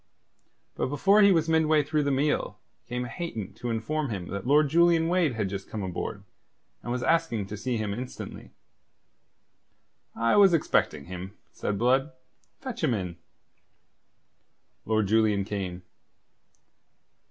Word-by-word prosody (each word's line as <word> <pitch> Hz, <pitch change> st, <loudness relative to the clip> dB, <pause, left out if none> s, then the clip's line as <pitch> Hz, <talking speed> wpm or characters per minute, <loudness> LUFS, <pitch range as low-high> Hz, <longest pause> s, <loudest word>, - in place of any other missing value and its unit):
But -, -, -2 dB
before 195 Hz, +10 st, +4 dB
he 200 Hz, -1 st, +7 dB
was 165 Hz, -3 st, +2 dB
midway 160 Hz, -2 st, +3 dB
through 150 Hz, +1 st, 0 dB
the -, -, +1 dB
meal 145 Hz, +3 st, 0 dB, 0.3 s
came 125 Hz, 0 st, -3 dB
Hayton 115 Hz, -, -5 dB
to 120 Hz, -, -5 dB
inform 135 Hz, +6 st, -2 dB
him 95 Hz, -5 st, -5 dB
that 100 Hz, +4 st, -5 dB
Lord 150 Hz, +2 st, +5 dB
Julian 170 Hz, +1 st, +4 dB
Wade 175 Hz, -6 st, +2 dB
had 105 Hz, -3 st, -1 dB
just 95 Hz, 0 st, -6 dB
come 105 Hz, -2 st, -4 dB
aboard, 95 Hz, +2 st, -4 dB, 0.6 s
and 120 Hz, -, -5 dB
was 125 Hz, 0 st, -2 dB
asking 165 Hz, -11 st, +1 dB
to 105 Hz, -, -7 dB
see 120 Hz, +3 st, -2 dB
him 105 Hz, -2 st, -2 dB
instantly. 125 Hz, +4 st, -7 dB, 1.7 s
"I 115 Hz, -, +2 dB
was 195 Hz, -4 st, +7 dB
expecting 75 Hz, -, 0 dB
him," 95 Hz, +2 st, -8 dB
said 100 Hz, -, -3 dB
Blood. 130 Hz, +6 st, +2 dB, 0.5 s
"Fetch 255 Hz, -7 st, -6 dB
him 130 Hz, -7 st, +2 dB
in." 90 Hz, -4 st, -4 dB, 1.7 s
Lord 110 Hz, -1 st, +1 dB
Julian 105 Hz, -1 st, +2 dB
came. 95 Hz, -3 st, -4 dB
125 Hz, 140 wpm, -27 LUFS, 100-155 Hz, 1.7 s, he